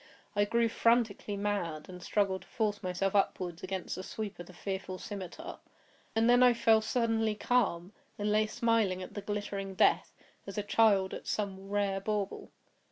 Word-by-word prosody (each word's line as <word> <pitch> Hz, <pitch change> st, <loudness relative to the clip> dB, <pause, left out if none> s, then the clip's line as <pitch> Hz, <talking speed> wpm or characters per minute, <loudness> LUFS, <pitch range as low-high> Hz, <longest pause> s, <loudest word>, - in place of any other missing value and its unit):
I 205 Hz, 0 st, +3 dB
grew 235 Hz, +2 st, +2 dB
frantically 225 Hz, -3 st, +1 dB
mad, 185 Hz, -7 st, -2 dB
and 180 Hz, -1 st, -9 dB
struggled 190 Hz, -1 st, 0 dB
to -, -, -17 dB
force 210 Hz, -3 st, -1 dB
myself 185 Hz, 0 st, -1 dB
upward 180 Hz, -3 st, 0 dB
against 185 Hz, -1 st, -3 dB
the -, -, -5 dB
sweep 210 Hz, 0 st, -6 dB
of 175 Hz, -, -8 dB
the -, -, -11 dB
fearful 190 Hz, 0 st, -4 dB
scimitar. 190 Hz, -3 st, -7 dB, 0.6 s
And 225 Hz, +1 st, +3 dB
then 245 Hz, +1 st, +6 dB
I 250 Hz, -1 st, +6 dB
fell 225 Hz, -1 st, +4 dB
suddenly 225 Hz, -2 st, +1 dB
calm, 205 Hz, -6 st, +1 dB, 0.2 s
and 210 Hz, 0 st, 0 dB
lay 215 Hz, +1 st, +3 dB
smiling 220 Hz, -6 st, +1 dB
at -, -, -9 dB
the 205 Hz, -, -5 dB
glittering 200 Hz, -2 st, -4 dB
death, -, -, +3 dB, 0.4 s
as 195 Hz, -, -7 dB
a 210 Hz, -, 0 dB
child 205 Hz, -2 st, +3 dB
at -, -, -7 dB
some 195 Hz, -2 st, -3 dB
rare 200 Hz, -1 st, 0 dB
bauble. 205 Hz, -1 st, -2 dB
205 Hz, 170 wpm, -31 LUFS, 190-220 Hz, 0.6 s, then